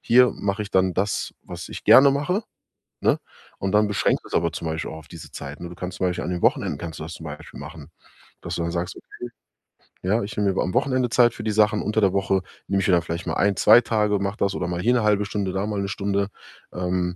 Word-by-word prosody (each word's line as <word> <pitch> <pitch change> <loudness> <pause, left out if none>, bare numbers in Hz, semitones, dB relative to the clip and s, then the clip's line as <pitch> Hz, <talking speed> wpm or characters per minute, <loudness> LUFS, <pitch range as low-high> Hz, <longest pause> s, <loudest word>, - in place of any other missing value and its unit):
hier 125 +1 +5
mache 100 +1 -2
ich 105 - -8
dann 95 -1 +2
das, 100 +2 -1
was - - -8
ich - - -8
gerne 140 +1 +8
mache,“ 180 +10 0 0.6
ne? - - +3 0.4
Und 95 - -2
dann 105 0 +4
beschränkst 105 - 0
du - - -12
es - - -9
aber 85 - +2
zum 80 +1 -6
Beispiel 80 0 -3
auch 80 - -7
auf 80 -1 -13
diese 85 -3 -11
Zeit. 70 0 -8
Ne, 85 - -6
du 85 - -10
kannst 90 0 -6
zum 95 - +1
Beispiel 90 - -2
an - - -3
den 90 -1 -3
Wochenenden - - +1
kannst 85 -2 -6
du - - -6
das 85 - -7
zum 80 - -9
Beispiel 75 0 -9
machen, 75 +1 -10 0.5
dass - - -5
du 85 - -2
dann 85 - -1
sagst: 85 0 -3
„Okay, 120 0 -9 0.7
ja, 105 +5 +2
ich 100 - -6
nehme 100 -1 +2
mir 95 - -1
mal - - +1
am 90 - -3
Wochenende 130 -1 +1
Zeit 120 -1 +4
für - - -8
die 110 - 0
Sachen. 105 0 +3
Unter 105 +1 0
der 95 -2 +4
Woche 95 -1 +1 0.3
nehme 100 0 +1
ich - - 0
mir - - +4
dann 85 - +4
vielleicht 85 +2 -5
mal - - -1
1, 100 -1 +2
2 120 - +7
Tage, 105 -3 +1
mache 100 +2 -2
das 100 0 0
oder 90 - -2
mal 90 0 -2
hier 120 +4 +3
'ne 120 -3 +2
0,5 105 -1 +3
Stunde, 100 -2 -2
da 95 +1 -1
mal 105 -2 -2
1 100 - -1
Stunde. 100 0 -1 0.5
Ähm, 90 0 -1
100 Hz, 270 wpm, -24 LUFS, 90-105 Hz, 0.7 s, gerne